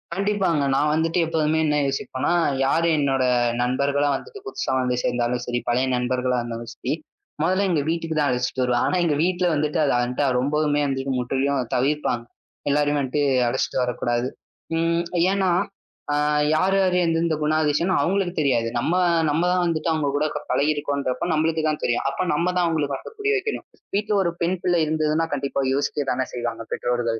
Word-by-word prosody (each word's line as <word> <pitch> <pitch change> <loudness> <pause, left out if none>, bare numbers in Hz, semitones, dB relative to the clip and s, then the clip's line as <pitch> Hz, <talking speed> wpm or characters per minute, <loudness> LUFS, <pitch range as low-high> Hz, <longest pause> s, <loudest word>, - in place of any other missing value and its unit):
கண்டிப்பாங்க. 195 -6 +1
நான் 150 +2 +2
வந்துட்டு 165 +2 +1
எப்பவுமே 160 -1 +1
என்ன 150 -1 +1
யோசிப்பேன்னா, 135 +2 -1 0.3
யாரு 165 +4 +2
என்னோட 135 -3 +1 0.4
நண்பர்களா 140 +3 +1
வந்துட்டு 450 -3 -8
புதுசா 390 - -3
வந்து 125 -1 0
சேர்ந்தாலும் 120 0 0
சரி, 120 0 -1
பழைய 130 +2 +2
நண்பர்களா 125 0 0
வந்தாலும் 115 0 -6
சரி, - - -2 0.5
முதல்ல 185 +5 +2
எங்க 160 -5 +2
வீட்டுக்குத்தான் 160 -3 0
அழைச்சிட்டு 125 +1 -1
வருவேன். 125 -1 +1
ஆனா - - +1
எங்க 150 -3 +1
வீட்டுல 180 0 +1
வந்துட்டு, 150 0 0
அது 140 - +2
வந்துட்டு 125 +3 0
ரொம்பவுமே 145 +2 +1
வந்துட்டு 135 -1 -2
முற்றிலும் 130 +1 0
தவிர்ப்பாங்க. 130 -3 0 0.4
எல்லாரையும் 145 0 +2
வந்துட்டு 140 +2 0 0.2
அழைச்சிட்டு 125 +2 -1
வரக் 125 -1 -2
கூடாது. 120 +1 0 0.5
அம், 170 +1 +1 0.3
ஏன்னா, 195 -1 +1 0.6
ஆ, - - +2 0.4
யாரு 190 +4 +2
யாரு 185 -1 +2
எந்த 165 -1 +1
எந்த 165 -2 +1
குணாதிசயம்னு 155 +4 +1
அவங்களுக்கு 185 +2 0
தெரியாது. 125 -6 +2
நம்ம 160 +8 0 0.4
நம்ம 160 +4 +1
தான் 180 -1 +2
வந்துட்டு 165 0 -1
அவங்க 150 -3 0
கூடப் 150 +1 0 0.2
பழகி 150 +2 +2
இருக்கோம்ன்றப்போ, 140 -3 -2
நம்மளுக்குத்தான் 155 -1 0
தெரியும். 120 - 0
அப்போ 140 - -2
நம்ம 170 +4 0
தான் 175 - +3
அவங்களுக்கு 150 -4 -1
வந்து 445 - -10
புரிய 420 +1 +1
வைக்கணும். 420 +3 -4 0.3
வீட்ல 210 +1 0
ஒரு 175 - +1
பெண்பிள்ளை 175 0 +1
இருந்ததுன்னா 155 +1 +1
கண்டிப்பா 140 0 -1
யோசிக்கத்தானே 135 -2 -1
செய்வாங்க 115 -2 -4
பெற்றோர்கள். 120 -2 -1
145 Hz, 160 wpm, -23 LUFS, 130-165 Hz, 0.6 s, தான்